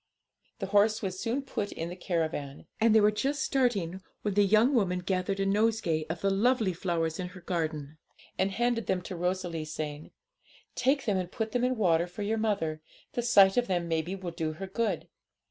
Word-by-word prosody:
The 195 - -3
horse 210 +3 +3
was 185 -1 -3
soon 240 +6 -1
put 205 -6 -3
in 165 +1 -4
the 175 - -6
caravan, 160 -6 -3
and 225 0 +4
they - - +8
were 210 0 +5
just 275 +7 -1
starting, 200 - 0 0.2
when 210 - 0
the 205 - +4
young 215 +7 +4
woman 190 -7 +2
gathered 190 +1 -1
a 195 - +1
nosegay 200 -6 +1
of 165 0 -4
the 195 - +2
lovely 220 -1 +2
flowers 165 -2 -1
in 180 - -2
her 185 +1 -11
garden, 155 -4 -3 0.4
and 190 - +1
handed 235 +2 0
them 185 -2 0
to 185 - -6
Rosalie, 175 -2 -2
saying, 155 -1 -5 0.6
'Take 270 +2 +1
them, 205 -3 +1
and 180 -1 -3
put 220 -1 -3
them 245 -1 0
in 255 0 +2
water 170 -4 +3
for 190 +4 -6
your 220 +2 0
mother; 180 -8 -1 0.3
the 240 - 0
sight 200 -4 +6
of 245 - +2
them 175 -3 0
maybe 165 +3 -1
will 185 -3 -5
do 160 -2 -3
her 195 +5 -6
good. 195 -2 -2
190 Hz, 200 wpm, -29 LUFS, 170-220 Hz, 0.6 s, they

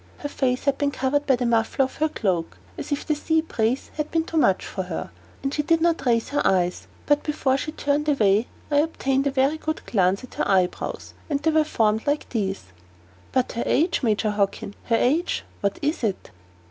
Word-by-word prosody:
Her 290 - -5
face 255 -3 0
had 280 -1 +1
been 285 -1 +2
covered 285 +1 0
by 265 - +5
the 245 0 -2
muffler 235 +3 +2
of 260 - -9
her 310 +1 +1
cloak, 180 - -1 0.2
as - - -7
if 285 - -1
the 305 - +1
sea 320 +2 +1
breeze 240 -4 -1
were - - +3
too 325 +2 -2
much 195 -12 +3
for 190 - -4
her; 165 - -5 0.3
and 275 0 -1
she 300 - +1
did 330 +2 +2
not 335 0 +2
even 245 - +2
raise 230 0 -1
her 290 - 0
eyes. 180 -1 +1 0.2
But 290 0 +3
before 290 -3 0
she 300 +3 -3
turned 295 0 0
away, 215 -5 +3 0.2
I 290 - +3
obtained 275 -3 +1
a 275 +2 +2
good 315 0 -4
glance 195 0 +1
at 255 - -11
her - - -1
eyebrows 185 -2 0 0.2
and 285 -2 0
they 320 - +1
were 315 0 +4
formed 220 -6 0
like 290 +1 0
these." 195 -4 -2 0.7
"But 255 -1 +1
her 235 - -2
age, 330 +6 +2
Major 215 -3 +1
Hockin! 200 -1 -1
Her 230 - +2
age 295 +10 +1 0.2
what 200 -2 0
is 300 -1 -1
it?" 200 - -2
270 Hz, 210 wpm, -24 LUFS, 220-295 Hz, 0.7 s, by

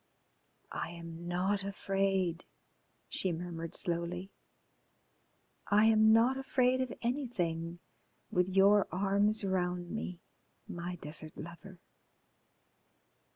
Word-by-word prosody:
"I - - -3
am 170 0 -8
not 190 +3 0
afraid," 195 -3 0 0.6
she 185 - -1
murmured 165 -1 -4
slowly. 175 +2 -2 1.4
"I 210 +2 +5
am 220 0 +6
not 235 +4 +5
afraid 260 -1 +2
of 255 -2 -2
anything 175 - -1 0.5
with 180 +1 +2
your 195 +2 +5
arms 200 +3 +2
round 180 -2 -1
me, 180 -5 -4 0.5
my 175 +1 -5
desert 155 -1 -4
lover. 175 +4 -9
185 Hz, 95 wpm, -33 LUFS, 175-205 Hz, 1.4 s, am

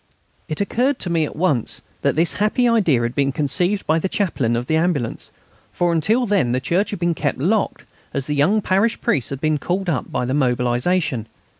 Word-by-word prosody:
It 155 - -4
occurred 245 +7 +1
to 175 - -3
me 165 -2 +2
at - - -8
once 150 -8 0 0.2
that - - +1
this 165 +2 +2
happy 230 +4 +2
idea 185 - +3
had 120 +1 -2
been 140 0 +1
conceived 175 +9 0
by 160 +1 +2
the 190 - -2
Chaplain 135 - 0
of 120 +1 -2
the 160 - 0
Ambulance, 160 -8 -1 0.4
for 175 -1 0
until 215 +10 +2
then 195 - +1
the 130 - +1
church 175 +10 0
had 205 - -4
been 170 0 0
kept 145 -3 -2
locked, 195 +9 0 0.3
as 135 - -3
the 150 - -2
young 180 +9 +2
parish 200 +5 +1
priest 135 - 0
had 140 - -5
been 155 0 0
called 185 +3 -2
up 140 - -3
by 125 - -1
the 130 - -2
mobilisation. 125 +1 0
160 Hz, 205 wpm, -21 LUFS, 135-195 Hz, 0.4 s, idea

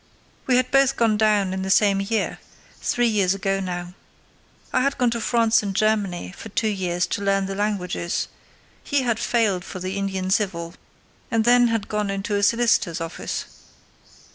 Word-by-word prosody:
We 255 - +4
had 255 0 0
both 275 0 +4
gone 225 -2 +2
down 210 -3 +2
in 190 - -3
the 190 - -3
same 200 0 +4
year—three 225 +3 -3
years 200 -4 +2
ago 195 0 -1
now. 175 -1 -5 0.8
I - - +3
had 275 +2 0
gone 245 -2 +2
to 235 0 -2
France 230 -1 +3
and 200 -2 -4
Germany 200 - 0
for - - -9
two 220 +2 0
years 180 -3 -1
to - - -3
learn 195 -1 +1
the 195 - -4
languages; 195 -4 -2 0.6
he 285 -2 0
had 235 -2 0
failed 220 -6 +1
for 185 - -8
the 185 +2 -4
Indian 190 -1 -2
Civil, 170 -5 -1 0.6
and 225 -2 +1
then 245 0 +5
had 225 -3 -1
gone 210 -1 -2
into 195 +2 -3
a 200 - +1
solicitor's 220 -5 +2
office. 165 0 -4
200 Hz, 170 wpm, -23 LUFS, 190-230 Hz, 0.8 s, then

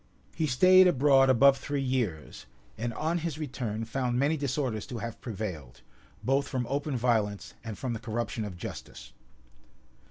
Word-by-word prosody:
He 160 - -1
staid 185 +8 +6
abroad 135 -4 +5
above 135 +2 +6
three 140 -1 -2
years; 115 - -3 0.3
and 120 +2 -3
on 165 +3 0
his 160 -3 -3
return 120 -7 -4
found 125 +1 -1
many 140 +5 +2
disorders 135 -6 -2
to 120 - -6
have 115 0 -6
prevailed, 95 - -6 0.4
both 135 +2 +1
from 125 -2 -2
open 140 +1 -2
violence 110 -4 0
and 110 -3 -6
from 125 -3 -3
the 115 - -4
corruption 115 0 -3
of 100 -4 -6
justice. - - -9
125 Hz, 155 wpm, -29 LUFS, 110-140 Hz, 0.4 s, staid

